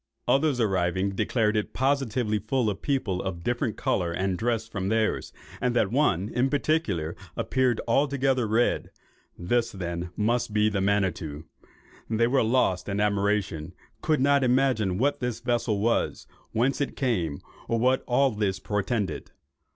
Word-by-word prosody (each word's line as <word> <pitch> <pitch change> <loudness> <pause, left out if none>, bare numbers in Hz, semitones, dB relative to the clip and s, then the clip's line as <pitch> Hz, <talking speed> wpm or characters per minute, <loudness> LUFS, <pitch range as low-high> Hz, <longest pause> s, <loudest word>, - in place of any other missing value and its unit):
Others 140 -2 +2
arriving, 95 -2 +1
declared 105 +2 0
it 105 - -1
positively 130 -5 0
to - - -13
be 105 - -29
full 125 -4 +1
of 95 - -8
people, 115 -10 -1
of 90 -3 -5
different 120 -1 -1
colour 85 -2 0
and 95 +2 -1
dress 115 +2 -1
from 95 -4 -3
theirs, 110 0 0 0.3
and 125 -1 0
that 105 -4 +2
one, 105 - +2
in 125 +3 +1
particular, 135 - 0 0.2
appeared 130 -3 +1
altogether 135 -1 +2
red. 115 +3 +1 0.5
This 115 +7 0
then 85 -2 -4
must 115 +1 0
be 105 0 +3
the 100 -2 -1
Manitto. 90 -7 -1 0.7
They 115 +1 +2
were 130 +3 +2
lost 110 -6 +1
in 100 +1 -1
admiration; 100 -5 0 0.3
could 155 -4 +1
not 140 0 +4
imagine 125 -7 +2
what 140 +6 +1
the 125 -3 -2
vessel 120 -4 0
was, 115 +3 0 0.3
whence 130 +5 +1
it 140 - -2
came, 90 - -1 0.3
or 115 - +1
what 130 +3 +2
all 135 +2 +3
this 105 -3 -1
portended. 105 0 -2
110 Hz, 155 wpm, -26 LUFS, 95-125 Hz, 0.7 s, not